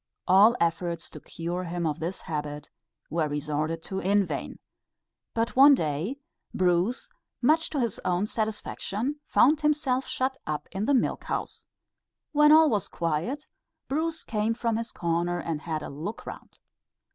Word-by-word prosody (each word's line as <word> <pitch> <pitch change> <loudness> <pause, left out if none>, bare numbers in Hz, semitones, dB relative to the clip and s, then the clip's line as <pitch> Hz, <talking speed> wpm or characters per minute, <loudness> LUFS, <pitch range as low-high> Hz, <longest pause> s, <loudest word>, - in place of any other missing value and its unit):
All 200 +6 +7
efforts 170 0 -1
to - - -9
cure 175 +2 -4
him 170 0 -3
of 155 0 -1
this 170 +4 -4
habit 150 -1 -5 0.4
were 160 -1 +1
resorted 150 +2 -2
to 190 - -4
in 200 +2 +3
vain. - - -5 0.8
But 230 +1 0
one 280 +2 +9
day, 160 - -2 0.4
Bruce, 185 - +1 0.3
much 310 +6 +3
to 295 - -2
his 235 -5 -1
own 180 +2 +1
satisfaction 220 +4 -3
found 300 +4 +4
himself 295 -4 +1
shut 265 +1 -1
up 150 -1 -3
in 195 +3 -2
the 285 - +4
milk 250 - 0
house. - - -4 0.6
When 300 -1 +6
all 315 0 +7
was 205 -4 0
quiet, 170 - -2 0.4
Bruce 320 +3 -1
came 220 +1 -1
from 230 -2 0
his 230 0 -4
corner 170 +1 -1
and 165 -3 -3
had 155 -2 -3
a - - -6
look 165 +10 -6
round. - - -10
195 Hz, 155 wpm, -27 LUFS, 165-260 Hz, 0.8 s, one